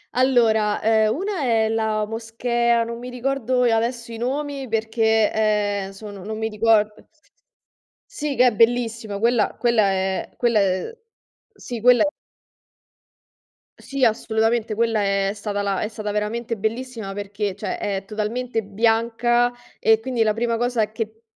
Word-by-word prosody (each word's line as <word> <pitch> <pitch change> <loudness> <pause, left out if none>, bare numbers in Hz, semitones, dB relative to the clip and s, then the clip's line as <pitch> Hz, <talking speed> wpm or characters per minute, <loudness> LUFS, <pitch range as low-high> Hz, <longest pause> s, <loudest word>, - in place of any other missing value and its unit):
Allora, 230 -5 +3
ehm, 220 0 +3
una 385 -1 -3
è 225 -3 +2
la 220 -1 0
moschea, 235 +1 0
non 235 +1 -6
mi 250 +1 -7
ricordo 250 0 -1
adesso 235 +1 0
i 230 - -6
nomi 275 +2 -3
perché, 220 -1 +1
ehm, 205 -2 0
sono 200 -1 -10
non 215 +1 -5
mi 220 0 -2
ricordo. 215 -1 +1 1.0
Sì, 295 -2 -3
che 250 +1 +5
è 245 - +4
bellissima. 230 -2 +1
Quella 230 0 +2
quella 235 -3 +3
è 190 0 -1
quella 235 -3 +2
è 195 - -1 0.6
sì 240 - -6
quella 245 -1 +6
è - - +2 1.7
Sì, 275 -2 0
assolutamente. 220 0 +1
Quella 225 -1 +1
è 195 0 +1
stata 205 -1 -3
la 195 -1 -1
è 215 - -1
stata 215 -1 -5
veramente 225 +3 -2
bellissima 225 0 -4
perché, 205 -1 -4
cioè - - -4
è 195 -2 -3
totalmente 225 +3 -2
bianca 230 +3 +1 0.3
e 225 0 +4
quindi 245 -1 -2
la 215 -1 +3
prima 230 0 0
cosa 235 -3 0
che 220 0 -5
225 Hz, 145 wpm, -22 LUFS, 210-240 Hz, 1.7 s, quella